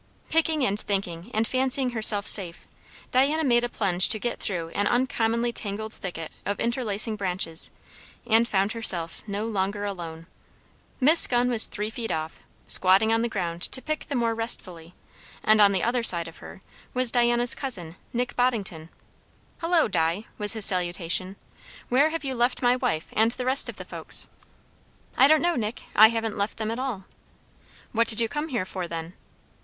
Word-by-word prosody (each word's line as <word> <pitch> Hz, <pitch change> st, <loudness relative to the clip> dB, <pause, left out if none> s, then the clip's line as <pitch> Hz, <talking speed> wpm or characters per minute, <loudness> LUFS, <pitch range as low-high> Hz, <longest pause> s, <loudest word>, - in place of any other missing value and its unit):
Picking 315 Hz, -3 st, +1 dB
and 205 Hz, +2 st, -1 dB
thinking 190 Hz, -2 st, -5 dB
and 220 Hz, 0 st, -1 dB
fancying 260 Hz, 0 st, 0 dB
herself 215 Hz, -3 st, +5 dB
safe, 180 Hz, -5 st, +3 dB, 0.5 s
Diana 285 Hz, +5 st, +1 dB
made 240 Hz, -4 st, +1 dB
a 240 Hz, -, -3 dB
plunge 185 Hz, -5 st, +3 dB
to 220 Hz, -, +3 dB
get 240 Hz, +3 st, -5 dB
through 170 Hz, -5 st, -4 dB
an 205 Hz, +4 st, -2 dB
uncommonly 235 Hz, -1 st, -1 dB
tangled 215 Hz, +1 st, -6 dB
thicket 165 Hz, -4 st, -7 dB
of 205 Hz, 0 st, -4 dB
interlacing 225 Hz, -3 st, -1 dB
branches, 180 Hz, -4 st, +1 dB, 0.6 s
and 230 Hz, 0 st, +2 dB
found 195 Hz, 0 st, -1 dB
herself 180 Hz, -8 st, +2 dB
no 205 Hz, +1 st, -4 dB
longer 205 Hz, -1 st, -3 dB
alone. 165 Hz, -5 st, -8 dB, 0.7 s
Miss 305 Hz, +5 st, +6 dB
Gunn 245 Hz, 0 st, 0 dB
was 225 Hz, -2 st, +5 dB
three 210 Hz, +1 st, -6 dB
feet 225 Hz, 0 st, -6 dB
off, 160 Hz, 0 st, -5 dB, 0.3 s
squatting 195 Hz, +4 st, +2 dB
on 225 Hz, -, 0 dB
the 235 Hz, -, -2 dB
ground 175 Hz, -5 st, -5 dB
to 260 Hz, -, +2 dB
pick 310 Hz, +3 st, -5 dB
the 285 Hz, -, -5 dB
more 230 Hz, -2 st, -1 dB
restfully; 180 Hz, -7 st, -1 dB, 0.5 s
and 215 Hz, 0 st, +3 dB
on 200 Hz, -1 st, +5 dB
the 190 Hz, -2 st, -2 dB
other 240 Hz, +1 st, -1 dB
side 170 Hz, -7 st, +3 dB
of 165 Hz, -, -13 dB
her 190 Hz, -, -14 dB, 0.3 s
was 255 Hz, -2 st, +2 dB
Diana's 240 Hz, 0 st, +2 dB
cousin, 180 Hz, -, -5 dB, 0.2 s
Nick 245 Hz, +1 st, -4 dB
Boddington. 200 Hz, -10 st, -2 dB, 0.7 s
"Hullo, 330 Hz, -1 st, +1 dB
Di!" 175 Hz, +2 st, -2 dB
was 205 Hz, -1 st, +3 dB
his 220 Hz, -3 st, +11 dB
salutation, 180 Hz, +1 st, +2 dB, 0.5 s
"where 275 Hz, +5 st, +2 dB
have 325 Hz, -1 st, -6 dB
you 270 Hz, -1 st, -3 dB
left 245 Hz, +1 st, -2 dB
my 245 Hz, 0 st, +3 dB
wife 160 Hz, -10 st, -3 dB
and 225 Hz, +2 st, +1 dB
the 250 Hz, 0 st, -6 dB
rest 260 Hz, +2 st, +3 dB
of -, -, -8 dB
the -, -, -10 dB
folks?" -, -, +2 dB, 0.9 s
"I 270 Hz, -, +5 dB
don't 310 Hz, +2 st, +3 dB
know, 345 Hz, 0 st, 0 dB
Nick; 220 Hz, -2 st, -5 dB
I 220 Hz, -, +8 dB
haven't 225 Hz, -2 st, -4 dB
left 200 Hz, +2 st, -3 dB
them 220 Hz, -1 st, -4 dB
at 230 Hz, -, -5 dB
all." 245 Hz, -8 st, -5 dB, 0.9 s
"What 230 Hz, 0 st, 0 dB
did 220 Hz, -, +1 dB
you 230 Hz, -, +2 dB
come 295 Hz, +5 st, -5 dB
here 240 Hz, -, -3 dB
for, 185 Hz, -2 st, -6 dB
then?" 165 Hz, +1 st, -8 dB
220 Hz, 180 wpm, -24 LUFS, 190-245 Hz, 0.9 s, his